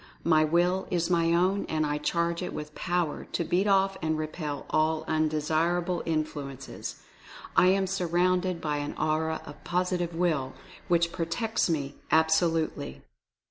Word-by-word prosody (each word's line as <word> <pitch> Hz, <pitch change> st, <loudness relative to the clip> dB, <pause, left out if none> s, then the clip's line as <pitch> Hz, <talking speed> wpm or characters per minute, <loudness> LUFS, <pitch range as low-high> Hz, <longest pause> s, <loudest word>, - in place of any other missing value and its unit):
My 155 Hz, -2 st, +4 dB
Will 175 Hz, +4 st, +2 dB
is 175 Hz, 0 st, 0 dB
my 165 Hz, -1 st, +3 dB
own, 185 Hz, +4 st, +2 dB
and 155 Hz, -1 st, +1 dB
I 150 Hz, 0 st, -1 dB
charge 170 Hz, +2 st, 0 dB
it 180 Hz, -, -4 dB
with 150 Hz, 0 st, -6 dB
Power 175 Hz, -3 st, -1 dB
to 170 Hz, -, 0 dB
beat 180 Hz, +5 st, +1 dB
off 195 Hz, -1 st, +3 dB
and 160 Hz, 0 st, 0 dB
repel 155 Hz, -2 st, -4 dB
all 155 Hz, 0 st, +1 dB
undesirable 160 Hz, +3 st, +1 dB
influences. 145 Hz, -4 st, -4 dB, 0.5 s
I 180 Hz, -, +6 dB
am 190 Hz, +1 st, +3 dB
surrounded 180 Hz, -1 st, +1 dB
by 150 Hz, -2 st, -1 dB
an 145 Hz, 0 st, -4 dB
Aura 155 Hz, +1 st, 0 dB
of -, -, -11 dB
Positive 175 Hz, -1 st, -1 dB
Will, 155 Hz, -7 st, 0 dB, 0.3 s
which 170 Hz, -2 st, +2 dB
protects 185 Hz, +6 st, -1 dB
me 145 Hz, -4 st, -1 dB, 0.2 s
absolutely." 160 Hz, -, +1 dB
165 Hz, 140 wpm, -28 LUFS, 155-180 Hz, 0.5 s, I